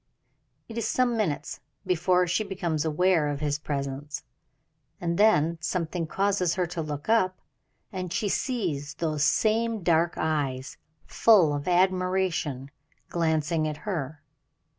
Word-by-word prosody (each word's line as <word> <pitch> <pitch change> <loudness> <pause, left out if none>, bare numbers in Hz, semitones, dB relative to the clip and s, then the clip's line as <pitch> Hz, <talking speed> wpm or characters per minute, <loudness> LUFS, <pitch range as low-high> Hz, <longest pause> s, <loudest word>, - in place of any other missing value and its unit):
It 230 0 -5
is 230 - -1
some 250 -2 +1
minutes 195 -10 -2 0.3
before 180 +1 +2
she 175 +5 0
becomes 175 -6 -2
aware 160 0 +2
of 145 -1 -2
his 145 -1 -1
presence, 140 0 -4 0.8
and 170 -1 -1
then 170 -6 +4
something 170 -1 -2
causes 190 -1 +1
her 180 - +1
to 170 - -2
look 150 -1 -5
up, 185 -5 +2 0.6
and 185 -2 -4
she 205 - -1
sees 170 - -2
those 155 -3 -1
same 225 +3 +1
dark 170 0 +2
eyes, 145 -4 -2 0.3
full 190 -10 +5
of 145 0 -4
admiration, 180 -6 +1 0.4
glancing 160 -1 0
at 150 -1 -4
her. 155 -6 -4
170 Hz, 130 wpm, -27 LUFS, 150-190 Hz, 0.8 s, full